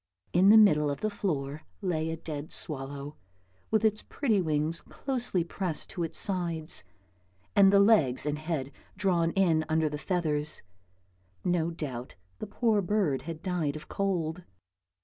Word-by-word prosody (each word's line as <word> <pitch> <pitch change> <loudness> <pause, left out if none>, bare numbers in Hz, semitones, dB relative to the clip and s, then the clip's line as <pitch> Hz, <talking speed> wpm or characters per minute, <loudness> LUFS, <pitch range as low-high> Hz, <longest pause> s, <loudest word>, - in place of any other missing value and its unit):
In 185 +3 +5
the 220 - +9
middle 150 -9 +5
of 140 - -4
the 215 - 0
floor 150 -8 -3 0.2
lay 160 -5 -1
a 160 - -3
dead 155 -2 -6
swallow, 140 0 -5 0.5
with 220 0 +2
its 215 -1 +2
pretty 225 -9 0
wings 155 0 0
closely 245 -9 -2
pressed 175 -2 -4
to 175 - -5
its 165 - -3
sides, 170 -5 0 0.7
and 195 -1 +7
the 200 - +6
legs 200 - +5
and 150 0 -1
head 155 -4 -3 0.3
drawn 180 -4 +2
in 170 -5 +3
under 160 0 +2
the 150 0 -5
feathers; 150 -2 -1 0.8
no 175 -2 +1
doubt 135 -7 -6 0.2
the - - -5
poor 215 0 +1
bird 185 -8 0
had 165 0 -7
died 170 -6 -1
of 155 - -9
cold. 180 -4 -1
165 Hz, 150 wpm, -29 LUFS, 150-195 Hz, 0.8 s, the